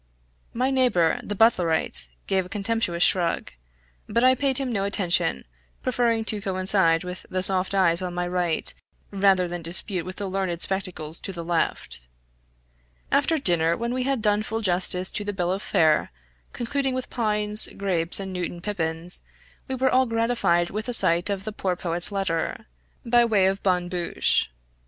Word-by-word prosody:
My 255 +3 -1
neighbor, 245 -12 +2
the 205 - -5
Butlerite, 175 - +4 0.2
gave 190 -1 0
a 180 - -13
contemptuous 205 -4 -1
shrug, 175 -3 +1 0.6
but 235 +3 +1
I 255 0 +6
paid 265 0 +3
him 270 -2 0
no 200 -4 -1
attention, 180 - 0 0.4
preferring 235 -3 0
to 215 -1 -3
coincide 185 -3 +2
with 180 0 -7
the 185 0 -1
soft 190 0 +4
eyes 175 -2 +3
on 180 -1 -5
my 175 0 -2
right, 175 -2 -2 0.4
rather 195 -2 +2
than 175 0 -5
dispute 175 +2 -2
with 185 +2 -8
the 200 - -5
learned 185 -3 -2
spectacles 180 -5 -2
to 195 - -3
the 170 -3 -7
left. 165 - -2 1.0
After 285 +3 +2
dinner 170 - +2
when 235 +1 -3
we 255 - -1
had 260 -3 -1
done 210 -1 +2
full 220 +1 -4
justice 180 -1 +1
to 210 - -2
the 205 0 -4
bill 180 -2 -1
of 195 +2 -2
fare, 155 - +2 0.4
concluding 265 +2 -2
with 255 - -5
pines, 210 -2 +1
grapes, 180 -3 -1
and 190 -1 -6
Newtown 175 -1 -4
pippins, 170 -3 -3 0.5
we 265 - -3
were 260 +1 +1
all 260 0 +3
gratified 230 -7 0
with 215 +4 -4
a - - -2
sight 175 -4 +3
of 195 -1 -3
the 215 - -5
poor 185 -3 -2
poet's 175 +1 0
letter, 195 -5 -2 0.4
by 240 0 +4
way 215 -5 +2
of 195 +1 0
bonne 180 -2 0
bouche. 175 - 0
190 Hz, 170 wpm, -24 LUFS, 175-225 Hz, 1.0 s, I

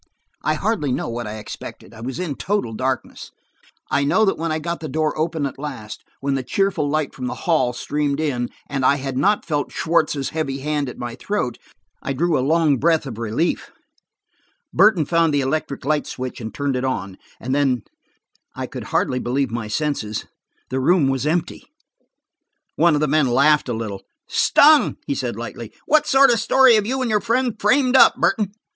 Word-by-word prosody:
I 155 - +1
hardly 170 - -1
know - - -2
what 120 -1 -4
I 105 +1 -6
expected. 105 +2 -9
I 115 - -12
was 125 +2 -5
in 180 -5 -3
total 195 - -2
darkness. 130 +2 -3 0.6
I 140 - +2
know 220 +10 +3
that 195 - +1
when 165 0 -3
I 155 - 0
got 170 +2 -4
the 155 - -6
door 155 +2 0
open 160 -1 -1
at 135 - -5
last, 130 -8 -7 0.2
when 140 0 0
the 135 - 0
cheerful 180 +2 0
light 155 0 -1
from 125 -1 -5
the - - -4
hall 155 -8 +2
streamed 145 +3 -2
in, 130 -6 -1 0.2
and 135 -2 -3
I 140 - +5
had 135 -1 -4
not 200 +10 +2
felt 145 -4 -2
Schwartz's 155 -4 0
heavy 155 -4 -3
hand 145 -1 -1
at - - -10
my 120 -1 -5
throat, 200 - -3 0.4
I 140 - -3
drew 165 +4 +1
a 130 - +2
long 155 0 +3
breath 160 +1 +2
of 115 -5 -7
relief. 115 +9 -1 1.0
Burton 185 -8 +4
found 165 -1 +2
the 140 - +2
electric 140 0 -2
light 150 0 0
switch 130 -1 -6
and 110 -1 -5
turned 140 -2 -2
it 125 - -2
on. 100 -8 -3 0.2
And 130 +2 -3
then–I 135 -5 -4
could - - -8
hardly 125 - 0
believe 130 +2 -1
my 115 -2 -3
senses. 110 -3 -2 0.5
The 130 - 0
room 145 +1 +3
was 135 +1 -1
empty. 170 +2 -2 1.1
One 170 -3 +4
of 145 - 0
the 150 - +2
men 150 -1 +3
laughed 140 +3 +3
a - - 0
little. 110 -4 -5 0.3
"Stung!" 300 +1 +5
he - - -1
said - - -3
lightly. - - -7
"What 310 - +3
sort 270 -1 +6
of 235 - +3
a - - -1
story 260 +3 +5
have 215 -2 +2
you 260 +2 -1
and 235 - -1
your 210 -1 +2
friend 240 0 0
framed 255 +4 +3
up, - - +7
Burton?' 205 -3 0
145 Hz, 195 wpm, -21 LUFS, 130-170 Hz, 1.1 s, up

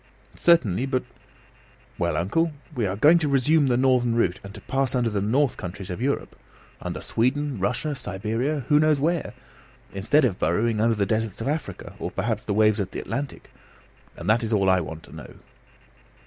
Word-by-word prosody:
"Certainly; 130 - +3
but 130 -1 0 0.5
" 130 0 -30
"Well, 85 -3 0
uncle, 155 - 0 0.2
we 115 -5 -1
are 95 - -2
going 155 +11 +5
to 155 - 0
resume 140 +2 +3
the 120 -2 +2
northern 125 -2 +2
route, 100 -5 +1
and 100 - -9
to - - -9
pass 135 -1 0
under 120 -2 +1
the 100 -1 -1
north 125 +6 +1
countries 95 +1 -7
of 90 - -5
Europe 140 +2 -2 0.5
under - - -5
Sweden, 135 +1 0
Russia, 125 +10 -1
Siberia: 115 +5 -2
who 145 +5 +3
knows 155 -2 +3
where? 165 +3 -1 0.6
instead 120 +10 +3
of 100 -7 -1
burrowing 105 +7 +1
under 115 0 +3
the 100 -2 +1
deserts 110 0 -1
of 115 - -4
Africa, 140 - -4
or - - -3
perhaps 110 -2 -3
the 100 - 0
waves 110 0 +4
of 95 -2 -2
the - - -6
Atlantic; 140 -1 -5 0.7
and - - -7
that 110 +2 +3
is 115 -1 -3
all 100 -3 +3
I 95 -1 +3
want 80 0 -7
to - - -14
know." - - -10
115 Hz, 190 wpm, -24 LUFS, 100-140 Hz, 0.7 s, going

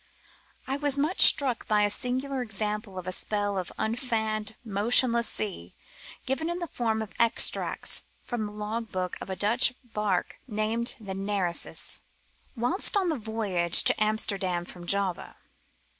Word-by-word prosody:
I 270 +1 -2
was 285 -1 +1
much 305 +6 +1
struck 260 -5 +7
by 210 -1 +3
a 205 - +3
singular 260 +3 -1
example 210 -2 -3
of 185 - -6
a 185 - -3
spell 205 +1 -1
of 185 -2 -4
unfanned 220 -2 -2
motionless 235 +3 +3
sea 180 - -5 0.5
given 295 +6 -1
in 345 - -2
the 350 - -4
form 225 -7 -2
of 215 - -11
extracts 235 -1 +3 0.2
from 230 -4 -3
the - - -9
log 215 +2 -5
book 185 -1 -3
of - - -8
a 190 - -3
Dutch 235 +5 +3
barque 210 -6 -2
named 225 +2 -1
the 200 -3 -6
Nereus, 195 -3 -1 0.5
whilst 265 - +1
on 370 -4 +1
a - - -1
voyage 210 - +1
to - - +2
Amsterdam 200 -5 -1
from 175 -1 -11
Java. 195 -2 -1
215 Hz, 150 wpm, -27 LUFS, 200-245 Hz, 0.5 s, struck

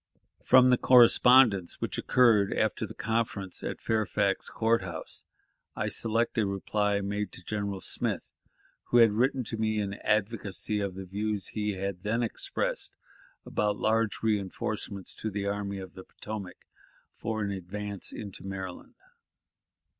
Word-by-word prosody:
From 130 0 +6
the 125 - +4
correspondence 120 -5 +6
which - - -3
occurred 115 -6 +4
after - - 0
the - - -10
conference 110 -4 -2
at - - -4
Fairfax 105 -3 0
Court 115 0 +1
House, 85 -3 -6 0.5
I - - -1
select 115 +1 0
a 105 - +2
reply 100 +1 0
made 100 +1 -3
to - - -9
General 100 -2 -3
Smith, - - -2 0.6
who 120 - +2
had 115 -2 +7
written 125 +4 +1
to 115 0 -5
me 110 -1 0
in 100 -1 -2
advocacy 105 -1 0
of 100 -2 -3
the 95 0 -6
views 105 +2 -3
he 105 -1 -2
had 95 -1 -4
then 115 +3 0
expressed 115 - -3 0.5
about 105 -1 0
large 110 0 +1
reënforcements 100 -2 -2
to 110 - -2
the 100 -1 -3
Army 100 0 -2
of 95 -1 -8
the 95 - -10
Potomac, 100 -4 -8 0.5
for 110 -1 -3
an 100 - -2
advance 100 +1 -4
into 100 -4 -7
Maryland. 95 -2 -7
105 Hz, 145 wpm, -29 LUFS, 100-110 Hz, 0.6 s, had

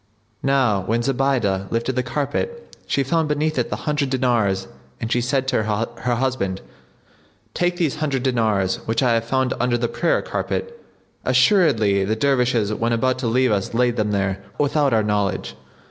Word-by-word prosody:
Now 130 -8 +2
when 115 +5 -1
Zubaydah 125 -8 0
lifted 115 +3 -1
the 130 - +2
carpet 150 - -3
she 140 - +1
found 160 +3 +1
beneath 150 +1 0
it - - -1
the - - -2
hundred 150 -3 0
dinars 115 -8 +1 0.3
and 115 - -4
she 120 - +2
said 130 +2 0
to 110 - +1
her 115 +3 -2
husband, 115 -7 -1 0.9
"Take 175 0 0
these 155 -4 0
hundred 140 -4 -1
dinars 110 -7 +1
which 115 +4 +1
I 120 -2 +3
have 115 0 0
found 130 +1 0
under 120 0 +1
the 120 0 0
prayer 170 - 0
carpet; 470 0 -4 0.4
assuredly 115 - +3
the 105 +3 0
Dervishes 125 -4 +1
when 115 +2 0
about 130 +2 +1
to 125 - -2
leave 125 +1 +2
us 100 +2 -1
laid 120 0 +2
them 105 -2 0
there, 100 -1 -1
without 145 -1 +2
our 110 -2 +3
knowledge." 100 -9 -1
120 Hz, 170 wpm, -21 LUFS, 110-135 Hz, 0.9 s, I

